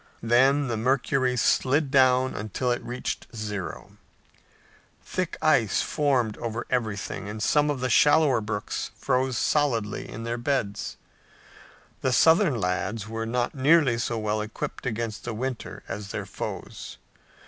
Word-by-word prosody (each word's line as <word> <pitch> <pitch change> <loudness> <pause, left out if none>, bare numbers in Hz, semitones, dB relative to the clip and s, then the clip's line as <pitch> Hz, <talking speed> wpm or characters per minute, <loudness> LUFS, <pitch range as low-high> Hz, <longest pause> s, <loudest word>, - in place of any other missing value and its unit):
Then 135 +5 +4
the 115 -2 -2
mercury 130 +1 +1
slid 135 +4 +2
down 130 -1 +4
until 110 +4 -2
it 120 - -2
reached 125 +1 -4
zero. 105 -4 -6 1.1
Thick - - -3
ice - - +3
formed 130 -7 +1
over 115 0 -4
everything 105 -4 -2
and 105 - -5
some 150 +7 +2
of 140 -3 -2
the 130 - 0
shallower 145 -2 +5
brooks 105 -1 -3
froze 130 -1 0
solidly 120 -9 0
in 115 - -7
their 120 +1 -3
beds. 120 -6 -2 1.0
The 130 - +1
Southern 160 - +4
lads 95 +3 -2
were 115 +1 -4
not 120 +1 -1
nearly 140 -3 +4
so 120 0 -1
well 110 0 -1
equipped 110 +4 -5
against 115 -2 -3
the 120 -2 -4
winter 130 +1 -5
as 100 0 -5
their - - -4
foes. - - -7
120 Hz, 135 wpm, -26 LUFS, 110-130 Hz, 1.1 s, shallower